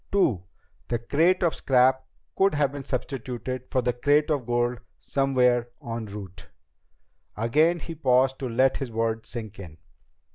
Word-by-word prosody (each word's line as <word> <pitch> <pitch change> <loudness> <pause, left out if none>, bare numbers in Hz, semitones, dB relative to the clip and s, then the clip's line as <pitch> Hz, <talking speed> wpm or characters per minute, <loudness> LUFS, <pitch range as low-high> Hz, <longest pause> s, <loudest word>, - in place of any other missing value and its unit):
Two: 130 - +2 0.4
the 120 - 0
crate 165 +11 +2
of 170 - +2
scrap 130 0 +2 0.3
could 195 -3 +3
have 145 -2 +2
been 140 -1 -7
substituted 130 -1 -4
for 130 -3 0
the 125 +1 +1
crate 145 +5 +2
of 135 -5 -1
gold 120 0 0 0.2
somewhere 125 -3 +1
en 115 -5 -5
route." 100 -3 -9 0.9
Again 150 +10 +3
he 165 - -7
paused 130 -3 +2
to 130 - -3
let 130 +3 +2
his 135 -4 -5
words 115 0 -2
sink 110 -4 -7
in. 85 -5 -10
125 Hz, 150 wpm, -26 LUFS, 115-140 Hz, 0.9 s, could